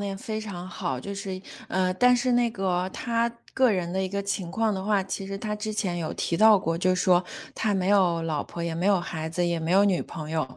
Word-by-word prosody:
点 200 -1 -3
非 220 0 -4
常 185 -4 -7
好。 130 -7 -3
就 200 +9 -6
是 190 -1 -5 0.3
嗯， 185 -1 +1
但 250 0 +6
是 250 +1 +1
那 240 -1 +3
个， 185 -3 -1
他 235 -1 0 0.3
个 260 -2 +4
人 180 -4 -1
的 190 0 0
一 190 - -1
个 200 +1 -2
情 200 -3 -3
况 220 0 +1
的 190 - -3
话， 205 -2 +2
其 195 0 -4
实 195 0 -5
他 210 +1 -3
之 215 +1 -4
前 185 -5 -1
有 160 -2 -3
提 170 - -1
到 215 0 +7
过， 165 -2 -1
就 185 +2 +2
是 - - -2
说 180 -2 +4 0.3
他 215 -2 0
没 185 -1 0
有 180 -5 +3
老 155 -3 -1
婆， 170 - -9
也 170 -1 -2
没 175 +4 -1
有 200 -3 +4
孩 160 -2 -4
子， 175 +2 -1
也 170 -1 0
没 160 - -2
有 195 +3 +5
女 190 -3 +2
朋 155 -1 -7
友， 155 -5 -2
190 Hz, 280 characters per minute, -26 LUFS, 175-210 Hz, 0.3 s, 到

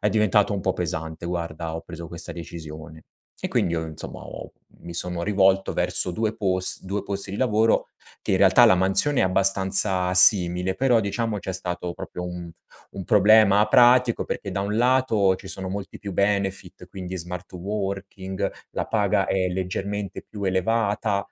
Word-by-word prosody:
è 105 - +1
diventato 105 0 +2
un 95 - -3
po' 95 - +1
pesante, 80 -2 -5
guarda, 85 -2 -4
ho 80 - -6
preso 85 -1 -9
questa 85 0 -7
decisione. 80 -1 -10 0.4
E - - -2
quindi 85 - 0
io, 80 0 -3
insomma, 80 -1 -7
ho - - -9 0.3
mi 85 - -9
sono 90 0 -2
rivolto 95 -1 +2
verso 90 - 0
2 110 +4 -2
pos 95 -2 +1
2 100 +1 -3
posti 100 -1 -4
di 100 - -5
lavoro 110 -2 +1 0.3
che, - - -2
in - - +3
realtà, - - +6
la - - +6
mansione 95 +10 +2
è - - +4
abbastanza 95 0 +2
simile 90 -1 +5
però, 125 -3 +2
diciamo, 110 +1 -2
c'è 95 -1 -5
stato 90 -1 -4
proprio 90 - -7
un 90 -1 -7 0.4
un 95 -2 -8
problema 105 0 +5
pratico 125 -1 +4
perché, 100 - -5
da 95 +1 -3
un 105 +2 -2
lato, 120 -6 +2
ci - - -14
sono 95 -1 -5
molti 100 0 -6
più 100 -3 -6
benefit, 100 -2 -1
quindi 95 -1 -7
smart 90 +1 -7
working, 95 0 -4 0.2
la - - -4
paga - - +1
è 95 -1 0
leggermente 95 +2 -4
più 105 -2 -9
elevata, 100 +1 0
95 Hz, 170 wpm, -23 LUFS, 90-105 Hz, 0.4 s, realtà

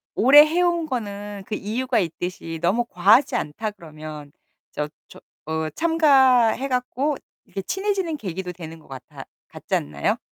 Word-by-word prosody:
오래 290 +6 +8
해온 345 0 +1
거는 205 -6 -5
그 215 - -3
이유가 240 +5 -1
있듯이 165 -1 -4
너무 235 +7 +2
과하지 215 +8 +4
않다 210 +9 -3
그러면 155 -5 -10 0.4
저 150 - -3 0.2
저 - - -14 0.3
어 160 0 -1
참가해 270 - +4
갖고 260 +3 -1 0.3
이렇게 195 - -6
친해지는 385 - -2
계기도 185 -4 -5
되는 165 -2 -10
것 155 - -21
같아 135 -2 -10 0.2
같지 - - -4
않나요? 70 0 -1
215 Hz, 295 characters per minute, -23 LUFS, 165-275 Hz, 0.4 s, 오래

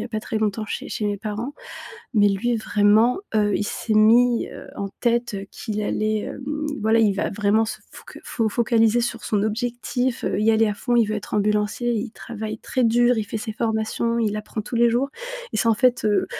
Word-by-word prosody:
y - - -4
a - - -7
pas 215 -2 -3
très 220 - -4
longtemps 215 0 -1
chez - - -5
chez 210 - -2
mes 205 - -1
parents. 220 +6 -5 0.6
Mais 205 -2 +5
lui 230 +5 0
vraiment, 215 - +3 0.2
heu, 205 -2 +2
il - - -1
s'est 215 +1 -2
mis, 230 +3 +4
heu, - - -10
en 200 0 -4
tête, 235 -1 +1
heu, 200 0 -5
qu'il 215 -2 -4
allait, 215 +1 0
hem, 295 +3 -4 0.2
voilà, 220 +1 +3
il 215 -3 +3
va 200 - -1
vraiment 210 +2 +2
se 220 - -5
foc - - -12
fo 225 -3 -1
focaliser 225 0 +3
sur 240 0 -3
son 205 -2 0
objectif, 245 +3 -2
heu, - - 0
y 215 +2 +3
aller 225 0 +4
à 210 - -1
fond, 245 +4 -2
il 235 -3 +4
veut 215 - -2
être 210 - -8
ambulancier, 210 +3 +1
il 225 +2 -3
travaille 220 -1 -6
très 255 +2 -1
dur, 240 +2 +4
il 220 - -1
fait 220 - -4
ses 220 0 -5
formations, 225 +1 -1
il 210 0 -1
apprend 215 +1 -5
tous 215 - -7
les 235 0 +4
jours, 245 +4 +1 0.4
et - - -1
c'est 230 - +2
en 225 - +5
fait, 250 +1 +2
heu, 210 -1 +2
220 Hz, 225 wpm, -23 LUFS, 210-235 Hz, 0.6 s, Mais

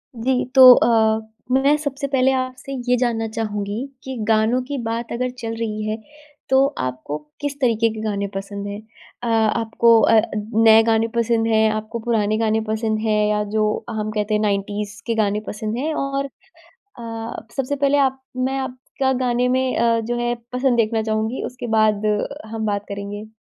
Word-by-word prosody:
जी, 250 +2 0
तो 260 -1 +11
अ, 220 -2 +3 0.3
मैं 275 +3 +4
सबसे 280 -1 -3
पहले 265 -1 +2
आपसे 255 +1 -4 0.2
ये 250 - +5
जानना 230 -2 0
चाहूँगी 215 +1 -3 0.2
कि 265 0 -6
गानों 225 +3 +3
की 280 +2 -5
बात 230 +1 -3
अगर 250 +2 -1
चल 225 -1 -4
रही 215 -2 -3
है, 215 - -2 0.5
तो 265 +1 +5
आपको 130 +3 -3 0.2
किस 285 0 -3
तरीके 230 -2 +3
के 220 - -6
गाने 200 -2 -2
पसंद 200 +1 -5
है? 200 0 -5 0.5
अ, - - -2
आपको 225 +1 +3
अ, 225 - +5 0.2
नए 220 +1 +5
गाने 225 0 +2
पसंद 230 -1 +1
हैं? 220 -1 +3
आपको 215 +2 -4
पुराने 215 -2 +1
गाने 220 0 +1
पसंद 220 0 -1
हैं? 215 -1 +1
या 210 0 +1
जो 215 -1 +2 0.2
हम 215 -1 -3
कहते 210 0 -1
हैं 210 - +2
90s 205 0 -2
के 230 - 0
गाने 210 -1 +1
पसंद 215 +1 -4
है? 305 +5 -1
और 275 -1 -2 0.7
अ, 225 -1 -6
सबसे 270 +1 -1
पहले 280 0 +2
आप 265 -1 +1 0.2
मैं 260 +1 0
आपका 265 +1 -2
गाने 245 0 +1
में 260 0 +1
अ, 230 0 +3
जो 240 +2 -3
है 240 0 0 0.2
पसंद 250 -1 +1
देखना 225 0 +1
चाहूँगी, 220 +3 -2
उसके 245 -1 -6
बाद 215 -1 +2 0.5
हम 220 -1 -2
बात 205 0 -2
करेंगे। 205 +1 -6
225 Hz, 175 wpm, -21 LUFS, 215-255 Hz, 0.7 s, तो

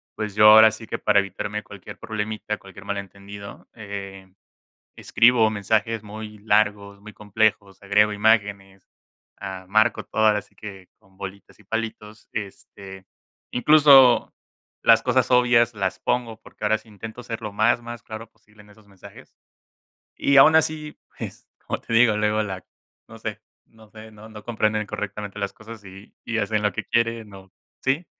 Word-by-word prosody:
pues 105 -2 -4
yo 105 +1 +6
ahora 110 0 +8
sí 110 +1 -10
que - - -4
para 105 -1 +3
evitarme 100 +2 -4
cualquier 100 -2 -12
problemita, 105 0 -4
cualquier 95 +1 -14
malentendido, 100 0 -8
eh, 100 -3 -9 0.6
escribo 115 -1 +3
mensajes 110 +1 -1
muy 105 0 -9
largos, 105 -1 0
muy 105 +1 -12
complejos, 105 -2 -1
agrego 105 +1 +3
imágenes. 100 -3 0 0.5
Ah, 95 -1 -7
marco 110 +3 +2
todo 110 0 0
ahora 105 -1 +3
sí - - -27
que 95 -3 -11
con 95 0 -28
bolitas 100 0 -10
y 105 - -21
palitos. 110 0 -6
Este, 95 -2 -9 0.4
incluso 135 -2 +5 0.5
las - - +5
cosas - - +1
obvias 120 -2 +4
las 95 -3 -3
pongo 115 -3 -2
porque - - -11
ahora 110 - +2
sí 110 +1 -22
intento 110 +3 -10
ser 115 -2 -6
lo 105 -2 -6
más, 110 +3 +2
más 120 0 -9
claro 110 0 -9
posible 110 -2 -22
en 105 - -21
esos 105 0 -21
mensajes. 100 -2 -16 0.8
Y 140 - +2
aun 155 +4 +7
así 155 -1 0 0.2
pues - - -9 0.2
como - - -3
te - - -7
digo 115 -2 +4
luego 105 0 +1
la 95 -3 -6 0.4
no - - -13
sé - - -6 0.2
no 110 -1 -20
sé, 110 +1 -13
no 110 +1 -14
no 105 -1 -12
comprenden 110 -2 -1
correctamente 105 0 -6
las 100 -1 -3
cosas 110 -1 -12
y 95 +1 -14
y 115 - -2
hacen 105 0 -1
lo 105 -1 +1
que - - -5
quieren 115 -2 -1
o, 95 -1 -14 0.3
¿sí? 140 +6 0
105 Hz, 165 wpm, -23 LUFS, 100-110 Hz, 0.8 s, ahora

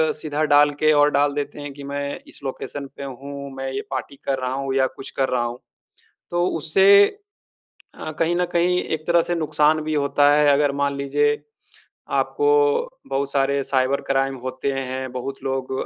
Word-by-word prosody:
सीधा 150 -1 -3
डाल 145 0 +6
के 155 0 +4
और 145 0 +5
डाल 145 0 +2
देते 145 0 -4
हैं 145 0 -6
कि 140 0 -10
मैं 140 0 -4
इस - - -13
लोकेशन 140 +1 -5
पे - - -6
हूँ, 140 +1 -7
मैं 135 0 -4
ये 135 - -3
पार्टी 130 +1 -4
कर 135 - 0
रहा 130 0 -2
हूँ 135 0 -2
या 130 -1 +3
कुछ 130 +1 -10
कर 135 -1 +1
रहा 125 -1 +1
हूँ। 120 +1 -4 0.7
तो 175 0 +1
उससे 195 +6 +6 0.9
अ, 155 - -6
कहीं 165 +1 +2
न 180 0 +1
कहीं 175 +1 +2
एक 155 0 -4
तरह 170 0 +4
से 175 - -2
नुकसान 155 -1 +2
भी 155 0 -2
होता 145 0 +3
है। 150 0 +4
अगर 145 0 +3
मान 140 0 +1
लीजिए, 145 +1 +1 0.7
आपको 435 0 +1 0.6
बहुत 140 +1 -1
सारे 140 0 +1
साइबर 130 +1 +1
क्राइम 135 0 +1
होते 130 +2 -2
हैं, 130 -1 -4
बहुत 130 +2 -6
लोग 135 -1 -3
140 Hz, 185 wpm, -22 LUFS, 135-150 Hz, 0.9 s, डाल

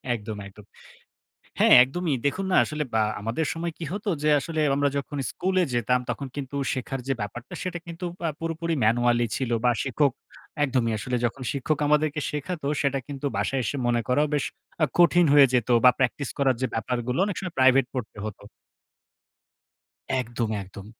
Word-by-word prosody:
একদম 110 -1 -6
একদম। 100 +1 -15 0.9
হ্যাঁ - - +7
একদমই। 155 +3 -2
দেখুন 185 +8 -1
না? - - +4
আসলে 150 0 -3
বা 110 - +3 0.2
আমাদের 115 +9 -2
সময় 170 +1 -3
কি 170 - -5
হতো 205 +2 -4
যে 150 - +2
আসলে 160 +2 -3
আমরা 145 0 +2
যখন 140 +1 -5
স্কুলে 185 0 0
যেতাম, 125 +2 +2
তখন 140 - -4
কিন্তু 140 0 -5 0.2
শেখার 130 +1 -4
যে - - +2
ব্যাপারটা 115 +4 -6
সেটা 180 -1 -3
কিন্তু 170 +1 -7 0.2
আ - - +1
পুরোপুরি 165 0 -2
manually 120 +1 +3
ছিল, 130 -3 -2
বা 125 - +5
শিক্ষক, 140 +1 +2 0.5
একদমই 125 -4 +1
আসলে 125 +4 -2
যখন 130 +3 -5
শিক্ষক 140 +2 -1
আমাদেরকে 150 0 +2
শেখাত, 155 +3 -4 0.2
সেটা 140 -1 +1
কিন্তু 145 0 -5
বাসায় 130 +6 0
এসে 140 - -2
মনে 120 -1 +2
করাও 145 +4 +3
বেশ 145 - +1 0.4
আ - - +7
কঠিন 175 0 +6
হয়ে 145 -2 +8
যেত। 125 -2 +2 0.2
বা 125 - +10
practice 130 +1 0
করার 135 -3 +2
যে 130 - +3
ব্যাপারগুলো, 120 +3 -2
অনেক 200 -2 -3
সময় 185 -3 -6
প্রাইভেট 130 0 +5
পড়তে 115 -4 -5
হত। 105 - -6 1.8
একদম 120 -2 -3
একদম। 95 +1 -11
135 Hz, 170 wpm, -25 LUFS, 120-155 Hz, 1.8 s, বা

